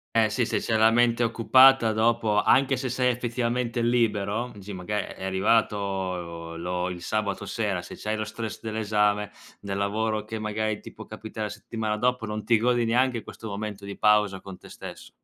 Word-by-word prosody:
Eh, 110 -1 +4
sì, 120 +3 0
se - - 0
c'è 110 - -1
la 110 +1 +5
mente 120 0 +3
occupata 115 +1 +5
dopo, 110 -1 +2
anche 135 0 +4
se 130 0 -3
sei 125 +1 +2
effettivamente 120 0 -1
libero, 115 -1 +1
dici 100 0 -9
maga 95 +3 -4
è - - -9
arrivato 95 -5 -1
lo 90 +1 -2
il 90 -1 -7
sabato 105 0 -2
sera, 100 -3 -2
se - - -10
c'hai 110 0 -3
lo 110 - -2
stress 110 +1 -6
dell'esame, 105 -2 0 0.3
nel 100 -1 -4
lavoro 105 +1 -1
che, 110 0 -5
magari, 105 0 -2
ti - - -10
può - - -11
capitare 110 -1 -6
settimana 105 +1 -4
dopo, 125 0 0
non 105 0 -4
ti 115 -2 +4
godi 120 +1 +2
neanche 120 0 +1
questo 110 - -9
momento 100 -1 -5
di 100 - -7
pausa 105 -3 +3
con 95 -2 -9
te - - -15
stesso. - - -10
110 Hz, 180 wpm, -26 LUFS, 100-115 Hz, 0.3 s, la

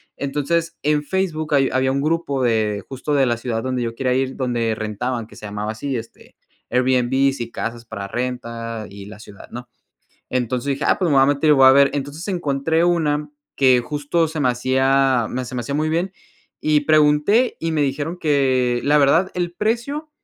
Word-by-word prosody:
Entonces, 165 +4 -2
en 150 0 +1
Facebook 155 -3 -2
hay 135 -2 +3
había 130 0 +2
un 135 - 0
grupo 155 -3 -1
de 110 -4 +1
justo 135 +3 -4
de 140 -2 +3
la 120 -2 +1
ciudad 115 -1 -3
donde 130 +1 -2
yo 115 -1 -2
quería 125 +1 -1
ir, 130 +1 -1
donde 120 -4 -1
rentaban, 110 +2 -3
que - - -16
se - - -10
llamaba 105 +1 -4
así, 130 +4 -3
este, 115 0 -11 0.3
"Airbnb 130 +1 +1
y 115 0 -5
casas 115 0 -5
para 100 -3 -7
renta 115 -1 -4
y 100 0 -10
la 105 0 -11
ciudad", 105 -2 -13
¿no? 120 +1 -8 0.6
Entonces 125 0 -1
dije: 140 +1 -1
"Ah, - - +3
pues, 185 - +1
me - - +3
voy 135 - +6
a - - +4
meter 145 +2 +2
y - - +8
voy 135 -2 +6
a - - +8
ver". 140 0 +5
Entonces 145 +4 -5
encontré 160 -3 0
una 150 -4 +1 0.3
que 130 -2 +4
justo 150 +5 -1
se 160 0 -5
me 135 - +2
hacía, 130 0 +2
me 130 +1 -3
se 125 +1 -8
me 125 - -2
hacía 130 +4 -4
muy 155 +1 0
bien, 170 +4 -1 0.5
y 150 -1 +2
pregunté, 155 - +3
y 165 - -1
me 155 -2 +1
dijeron 145 +5 -2
que 130 -6 +1
la 150 +1 +3
verdad 160 +7 +3
el 175 -1 -2
precio 240 - -2
135 Hz, 200 wpm, -21 LUFS, 120-150 Hz, 0.6 s, y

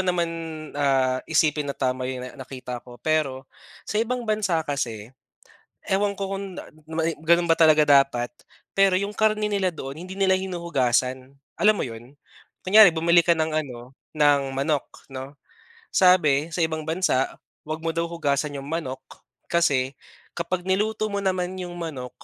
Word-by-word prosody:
naman, 180 -2 +1 0.4
ah, 135 -3 +1
isipin 150 -2 +2
na 140 - -4
tama 130 -1 -1
yung, 130 -1 -4
ah, 125 - -8
nakita 130 -2 -7
ko. 120 0 -14
Pero 140 -1 -1 0.4
sa 210 - -1
ibang 245 +2 -2
bansa 205 -7 0
kasi 120 -5 -4 0.7
ewan 200 0 0
ko 195 0 -3
kung 195 -2 -6
da - - -8 0.2
mai 160 0 -1
ganun 170 +1 +3
ba 165 - +4
talaga 155 -2 +5
dapat 135 -4 +4 0.5
pero 195 -1 +4
yung 200 +1 -3
karne 215 -1 +2
nila 195 -3 0
doon 135 -4 -7
hindi 190 +2 -8
nila 190 -1 +4
hinuhugasan. 135 -9 -1 0.3
Alam 215 +1 +6
mo - - -1
yun? 120 +4 -11 0.5
Kunyari 205 0 +8
bumili 170 +1 +4
ka 170 - 0
ng 160 0 0
ano 130 -4 -4 0.2
ng 145 -2 +4
manok, 140 +2 -2
'no, 135 +1 -9 0.6
sabi 160 -5 +4
sa 170 - -5
ibang 160 -2 0
bansa 160 -5 0 0.2
huwag 155 +1 -4
mo 165 - -1
daw 170 0 -1
hugasan 145 -3 -1
yung 135 - -8
manok 145 -4 -3 0.5
kasi 140 -6 +1 0.4
kapag 175 +1 -3
niluto 215 +3 0
mo 200 -1 -3
naman 185 -1 -1
yung 175 -2 -6
manok 140 -7 -5
160 Hz, 160 wpm, -24 LUFS, 135-185 Hz, 0.7 s, Kunyari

